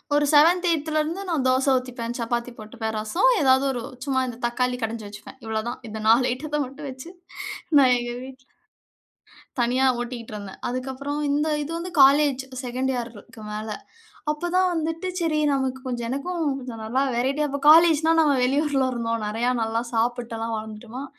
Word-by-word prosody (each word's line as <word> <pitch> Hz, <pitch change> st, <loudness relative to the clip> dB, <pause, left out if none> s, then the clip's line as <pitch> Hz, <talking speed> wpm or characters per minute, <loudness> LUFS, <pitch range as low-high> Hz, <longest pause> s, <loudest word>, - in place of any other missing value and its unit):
ஒரு 295 Hz, 0 st, +3 dB
7த், 335 Hz, +5 st, +5 dB
8த்லருந்து 315 Hz, +2 st, 0 dB
நான் 305 Hz, -6 st, 0 dB
தோச 255 Hz, +1 st, +2 dB
ஊத்திப்பேன். 245 Hz, -2 st, -5 dB
சப்பாத்தி 235 Hz, +1 st, -2 dB
போட்டுப்பேன். 220 Hz, +1 st, -5 dB
ரசம் 275 Hz, -, +2 dB
ஏதாவது 265 Hz, -1 st, +4 dB
ஒரு 245 Hz, -3 st, -4 dB, 0.2 s
சும்மா 270 Hz, -2 st, +1 dB
இந்த 240 Hz, -2 st, -6 dB
தக்காளி 250 Hz, +1 st, 0 dB
கடஞ்சு 225 Hz, -1 st, -3 dB
வச்சுப்பேன். 210 Hz, +5 st, -11 dB
இவ்வளோதான், 220 Hz, +2 st, -3 dB
இந்த 220 Hz, 0 st, -6 dB
4 235 Hz, +3 st, +5 dB
ஐட்டத்த 295 Hz, +4 st, -3 dB
மட்டும் 275 Hz, +3 st, -9 dB
வச்சு 260 Hz, +5 st, -9 dB, 0.7 s
நான் 255 Hz, -2 st, +6 dB
எங்க 240 Hz, 0 st, -4 dB
வீட்ல 260 Hz, 0 st, -12 dB, 1.2 s
தனியா 250 Hz, +3 st, +2 dB, 0.2 s
ஓட்டிட்ருந்தேன். 230 Hz, -5 st, -7 dB
அதுக்கப்பறம் 265 Hz, +3 st, -4 dB
இந்த 295 Hz, +2 st, +1 dB, 0.2 s
இது 295 Hz, -, -7 dB
வந்து, 355 Hz, +2 st, -5 dB
காலேஜ் 275 Hz, -1 st, +5 dB, 0.2 s
2ன்டு 255 Hz, +2 st, -1 dB
இயர்க்கு 235 Hz, -1 st, -8 dB
மேல, 215 Hz, +1 st, -5 dB, 0.7 s
அப்ப 345 Hz, +4 st, -4 dB
தான் 370 Hz, 0 st, +4 dB
வந்துட்டு 325 Hz, +3 st, -2 dB
சரி 310 Hz, -2 st, +1 dB
நமக்கு 265 Hz, -1 st, -2 dB
கொஞ்சம் 240 Hz, -2 st, -3 dB
எனக்கும் 330 Hz, +6 st, -3 dB, 0.2 s
கொஞ்சம் 240 Hz, -3 st, -7 dB
நல்லா 255 Hz, +5 st, +1 dB
வெரைட்டியா 275 Hz, +5 st, 0 dB
அப்ப 280 Hz, 0 st, -3 dB
காலேஜ்ன்னா, 325 Hz, 0 st, +6 dB
நம்ம 300 Hz, -3 st, +4 dB
வெளியூர்ல 275 Hz, 0 st, +1 dB
இருந்தோம். 230 Hz, -1 st, -2 dB
"நெறைய, 230 Hz, +4 st, 0 dB
நல்லா 225 Hz, +1 st, -1 dB
சாப்பிட்டல்லாம் 230 Hz, -1 st, -1 dB
வளர்ந்துட்டோமா, 220 Hz, +4 st, -7 dB
255 Hz, 155 wpm, -24 LUFS, 235-295 Hz, 1.2 s, நான்